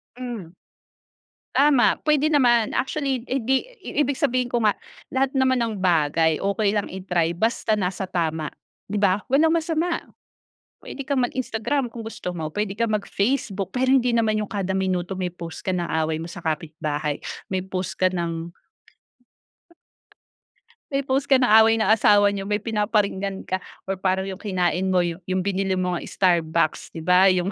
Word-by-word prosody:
Hmm. 230 Hz, -9 st, -7 dB, 1.0 s
Tama 280 Hz, -3 st, +4 dB
p'wede 305 Hz, +1 st, +3 dB
naman 240 Hz, -6 st, +4 dB
actually 270 Hz, -3 st, -2 dB
hindi 265 Hz, -, 0 dB, 0.2 s
i -, -, -4 dB
ibig 285 Hz, -1 st, +2 dB
sabihin 255 Hz, -2 st, +1 dB
ko 240 Hz, -2 st, -1 dB
nga, 210 Hz, -, +5 dB, 0.4 s
lahat 270 Hz, +1 st, 0 dB
naman 260 Hz, -1 st, +3 dB
ng 220 Hz, -5 st, -2 dB
bagay 160 Hz, -2 st, +2 dB
okey 200 Hz, +1 st, +1 dB
lang 205 Hz, -1 st, -1 dB
i-try 175 Hz, -3 st, -1 dB
basta 220 Hz, +2 st, +1 dB
nasa 190 Hz, -1 st, -2 dB
tama, 160 Hz, -3 st, -1 dB, 0.4 s
'di 205 Hz, -, -4 dB
ba? 200 Hz, -1 st, +3 dB
Walang 305 Hz, +5 st, +4 dB
masama, 335 Hz, +1 st, 0 dB, 0.8 s
puwede 275 Hz, -, -7 dB
kang 270 Hz, -3 st, +1 dB
mag-Instagram 255 Hz, +2 st, -2 dB
kung 230 Hz, -, -7 dB
gusto 180 Hz, -5 st, -5 dB
mo 160 Hz, -2 st, -3 dB
p'wede 210 Hz, -1 st, -2 dB
kang 230 Hz, -2 st, +1 dB
mag 205 Hz, -, -2 dB
Facebook. 200 Hz, -4 st, -1 dB
Pero 260 Hz, +1 st, +2 dB
hindi 250 Hz, -2 st, +4 dB
naman 215 Hz, -2 st, +2 dB
yung 210 Hz, -, -3 dB
kada 195 Hz, -2 st, -2 dB
minuto 185 Hz, -1 st, -1 dB
may 180 Hz, -1 st, -2 dB
post 170 Hz, -2 st, -8 dB
ka -, -, +2 dB
ng 175 Hz, -1 st, -2 dB, 0.2 s
away 155 Hz, 0 st, -1 dB
mo -, -, -6 dB
sa -, -, -8 dB
kapitbahay, 155 Hz, -2 st, -2 dB, 0.3 s
may 185 Hz, -, +1 dB
post 185 Hz, -1 st, -4 dB
ka 185 Hz, -, +4 dB
ng 170 Hz, -1 st, -3 dB, 2.4 s
May 275 Hz, 0 st, 0 dB
post 270 Hz, +1 st, 0 dB
ka 270 Hz, -, +6 dB
ng 255 Hz, -, +3 dB
away 220 Hz, +1 st, +6 dB
na 220 Hz, -1 st, +2 dB
asawa 205 Hz, -2 st, +5 dB
nyo 195 Hz, -1 st, -4 dB
may 210 Hz, 0 st, -1 dB
pinaparinggan 205 Hz, -3 st, -1 dB
ka 185 Hz, 0 st, -2 dB, 0.2 s
or 190 Hz, -1 st, -4 dB
parang 190 Hz, 0 st, +1 dB
yung 190 Hz, -1 st, -6 dB
kinain 185 Hz, -2 st, 0 dB
mo, 185 Hz, -1 st, +3 dB
yung 180 Hz, +2 st, -2 dB
binili 195 Hz, -1 st, 0 dB
mong 180 Hz, -1 st, -1 dB
Starbucks, 165 Hz, -5 st, +1 dB
'di 165 Hz, -, -5 dB
ba? 180 Hz, +3 st, +5 dB
Yung, 185 Hz, +1 st, +2 dB
200 Hz, 165 wpm, -23 LUFS, 180-245 Hz, 2.4 s, ka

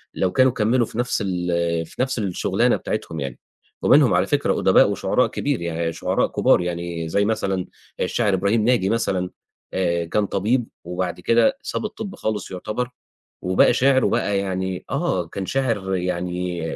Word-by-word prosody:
لو 95 Hz, -1 st, +1 dB
كانوا 130 Hz, +3 st, +4 dB
كمّلوا 120 Hz, +1 st, +2 dB
في 110 Hz, -, -10 dB
نَفْس 120 Hz, -3 st, 0 dB
ال 90 Hz, -1 st, -2 dB, 0.4 s
في 80 Hz, -, -6 dB
نَفْس 130 Hz, -2 st, -2 dB
الشُغلانة 95 Hz, -4 st, +1 dB
بتاعتهم 80 Hz, -, -4 dB
يعني. 70 Hz, -3 st, -5 dB, 0.4 s
ومنهم -, -, +5 dB
على -, -, +2 dB
فكرة -, -, +1 dB
أُدباء -, -, +5 dB
وشُعراء -, -, +1 dB
كبير -, -, -2 dB
يعني 85 Hz, -1 st, -2 dB
شُعراء -, -, 0 dB
كُبار، -, -, +3 dB
يعني 85 Hz, -1 st, -3 dB
زي 100 Hz, +5 st, +2 dB
مثلًا 95 Hz, -4 st, -1 dB, 0.3 s
الشاعر 105 Hz, -4 st, +1 dB
إبراهيم 100 Hz, +4 st, +1 dB
ناجي 120 Hz, -6 st, +3 dB
مثلًا، 95 Hz, -5 st, 0 dB, 0.4 s
آآ 85 Hz, -2 st, 0 dB
كان 105 Hz, +5 st, 0 dB
طبيب، 110 Hz, +6 st, 0 dB, 0.2 s
وبعد 90 Hz, 0 st, -3 dB
كده 120 Hz, -, +3 dB
ساب -, -, -3 dB
الطِب 215 Hz, -1 st, -6 dB
خالص 105 Hz, -3 st, -3 dB
يعتبر، 105 Hz, +7 st, -3 dB, 0.5 s
وبقى 95 Hz, +5 st, +4 dB
شاعر، 130 Hz, +1 st, +3 dB
وبقى 100 Hz, -1 st, +1 dB
يعني 95 Hz, -1 st, -3 dB
آه 90 Hz, -2 st, 0 dB
كان 95 Hz, +2 st, -5 dB
شاعر، 110 Hz, -8 st, -1 dB
يعني 90 Hz, -1 st, -2 dB
95 Hz, 160 wpm, -22 LUFS, 90-115 Hz, 0.5 s, ومنهم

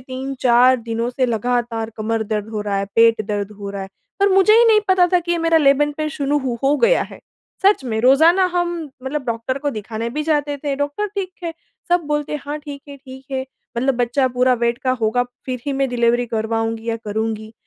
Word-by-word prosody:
3-4 255 Hz, -1 st, +2 dB
दिनों 230 Hz, 0 st, -3 dB
से 255 Hz, +1 st, 0 dB
लगातार 235 Hz, -1 st, -1 dB
कमर 220 Hz, +1 st, -1 dB
दर्द 215 Hz, 0 st, -3 dB
हो 215 Hz, -2 st, -3 dB
रहा 205 Hz, -1 st, -2 dB
है, 195 Hz, -, -1 dB
पेट 230 Hz, -1 st, +5 dB
दर्द 205 Hz, -1 st, -2 dB
हो 200 Hz, -1 st, -6 dB
रहा 200 Hz, -1 st, -5 dB
है, 190 Hz, -, -8 dB, 0.3 s
पर 400 Hz, -, +5 dB
मुझे 390 Hz, +2 st, +5 dB
ही 475 Hz, -, +6 dB
नहीं 430 Hz, -1 st, +5 dB
पता 370 Hz, -1 st, +5 dB
था 360 Hz, -, +5 dB
कि 345 Hz, +1 st, -2 dB
ये 345 Hz, -, 0 dB
मेरा 330 Hz, 0 st, +3 dB
लेबर 295 Hz, 0 st, +3 dB
पेन 310 Hz, 0 st, -2 dB
शुरू 295 Hz, -1 st, -1 dB
हो 255 Hz, -4 st, -3 dB
हो 280 Hz, +2 st, +3 dB
गया -, -, +4 dB
है -, -, -10 dB, 0.4 s
सच 395 Hz, -8 st, +4 dB
में, 220 Hz, -3 st, -2 dB
रोज़ाना 320 Hz, +9 st, +5 dB
हम 350 Hz, -1 st, 0 dB, 0.3 s
मतलब 265 Hz, +1 st, -3 dB
डॉक्टर 235 Hz, +3 st, -2 dB
को 290 Hz, 0 st, -2 dB
दिखाने 220 Hz, +1 st, -5 dB
भी 300 Hz, +4 st, -3 dB
जाते 295 Hz, -2 st, 0 dB
थे, 285 Hz, 0 st, -3 dB
डॉक्टर 290 Hz, +9 st, -2 dB
ठीक 380 Hz, -2 st, -3 dB
है 335 Hz, -, -2 dB, 0.4 s
सब 350 Hz, 0 st, +3 dB
बोलते 295 Hz, -1 st, -2 dB
हैं, 300 Hz, -, -3 dB
हाँ, 295 Hz, +1 st, -4 dB
ठीक 290 Hz, -2 st, -9 dB
है 280 Hz, -, -9 dB
ठीक 265 Hz, -1 st, -12 dB
है, 265 Hz, -1 st, -1 dB, 0.4 s
मतलब 260 Hz, +3 st, +1 dB
बच्चा 245 Hz, +2 st, +1 dB
पूरा 250 Hz, 0 st, +2 dB
वेट 235 Hz, 0 st, 0 dB
का 255 Hz, -, -1 dB
होगा 225 Hz, +3 st, +2 dB, 0.2 s
फिर 250 Hz, -2 st, -3 dB
ही 280 Hz, -, 0 dB
मैं 270 Hz, 0 st, 0 dB
डिलीवरी 240 Hz, 0 st, +1 dB
करवाऊँगी 225 Hz, 0 st, -2 dB
या 230 Hz, -, 0 dB
करूँगी। 220 Hz, +1 st, -3 dB
255 Hz, 220 wpm, -20 LUFS, 230-295 Hz, 0.4 s, ही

